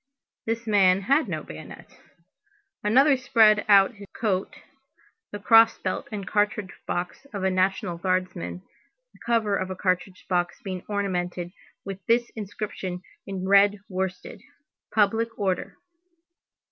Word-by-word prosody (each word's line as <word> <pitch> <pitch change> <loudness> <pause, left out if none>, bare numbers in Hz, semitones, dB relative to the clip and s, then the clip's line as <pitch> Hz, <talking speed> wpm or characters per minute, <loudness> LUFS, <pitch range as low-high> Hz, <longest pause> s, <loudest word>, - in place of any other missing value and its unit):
This 230 +1 -2
man 195 -3 +4
had 275 +9 +2
no - - -4
bayonet. - - -11 0.9
Another 270 +7 +5
spread 220 -5 +4
out 195 -1 +7
over 230 - -21
his 200 0 -11
coat 195 -4 -1 0.8
the 205 - -5
cross 225 +2 +6
belt 185 - -3
and 200 -3 -5
cartridge 205 -2 0 0.2
box 180 +10 -4
of 195 - -3
a 190 - +2
National 185 -2 0
Guardsman, 180 - -2 0.5
the - - -21
cover 225 -4 +1
of 185 - -2
the 185 - -5
cartridge 185 0 -2
box 175 -2 -1
being 185 -2 -5
ornamented 180 -4 -2 0.3
with 195 -1 -7
this 235 +1 +2
inscription 200 -3 -6 0.2
in 190 -1 -4
red 200 +1 +5
worsted: 185 -1 -4 0.5
Public 225 +2 +2
Order. 190 -3 -2
195 Hz, 135 wpm, -25 LUFS, 185-215 Hz, 0.9 s, out